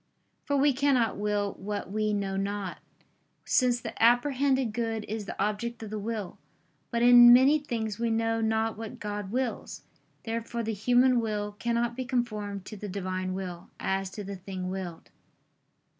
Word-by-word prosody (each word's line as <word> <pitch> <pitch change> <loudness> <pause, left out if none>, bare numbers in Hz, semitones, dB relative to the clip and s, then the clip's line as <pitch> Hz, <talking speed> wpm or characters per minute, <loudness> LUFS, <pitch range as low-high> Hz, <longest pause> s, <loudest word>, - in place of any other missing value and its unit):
For 285 -1 +1
we 280 +1 +4
cannot 260 -4 +2
will 205 -1 0
what 205 0 -4
we 215 0 0
know 200 -2 -1
not: 195 -1 -3 0.7
since 250 -2 +3
the - - -6
apprehended 260 +1 +3
good 225 -2 -2
is 215 0 -4
the - - -7
object 220 +3 -2
of 215 - -7
the 215 - -3
will. 210 -3 -4 0.5
But 235 -1 0
in 240 0 +9
many 265 +5 +6
things 230 -7 -4
we 235 0 0
know 225 0 0
not 220 0 0
what 225 +2 -7
God 205 -2 -4
wills. 250 0 -3 0.4
Therefore 230 +1 -3
the 220 0 -2
human 245 +4 +3
will 210 -2 -2
cannot 235 0 0
be 260 - -3
conformed 215 -6 -3
to 215 - -8
the 205 +1 -6
Divine 185 -1 -3
will 180 -2 -6
as 190 0 -1
to 205 - -4
the 200 0 -6
thing 185 0 -5
willed. 185 -3 -6
220 Hz, 165 wpm, -28 LUFS, 205-240 Hz, 0.7 s, in